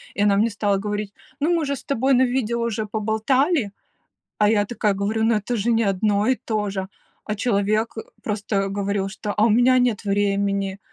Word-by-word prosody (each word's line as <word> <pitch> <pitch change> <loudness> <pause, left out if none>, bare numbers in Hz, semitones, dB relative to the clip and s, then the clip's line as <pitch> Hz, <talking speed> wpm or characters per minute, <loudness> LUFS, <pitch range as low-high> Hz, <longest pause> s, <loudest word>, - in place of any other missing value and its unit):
И 205 - +1
она 200 -1 +3
мне 220 +3 +3
стала 205 -1 0
говорить: 205 0 -4 0.3
"Ну 325 +4 +2
мы 330 -3 +1
же 280 0 -1
с - - -11
тобой 270 0 +1
на 255 - +4
видео 240 -2 -1
уже 225 -2 -2
поболтали", 220 - 0 0.7
а 210 - +4
я 210 -1 +3
такая 210 -2 0
говорю: 205 +3 -1
"Ну 225 0 +3
это 210 +4 -2
же 225 +2 0
не 230 0 +2
одно 200 +1 +1
и 260 - +4
то 210 -2 -1
же." 190 -1 -4 0.4
А 215 - -3
человек 215 0 0 0.3
просто 205 -2 -1
говорил, 200 0 -2
что: 205 +1 -5
"А 210 - +4
у - - +3
меня 245 +4 +4
нет 245 -4 +1
времени", 200 -1 0
210 Hz, 200 wpm, -22 LUFS, 200-235 Hz, 0.7 s, на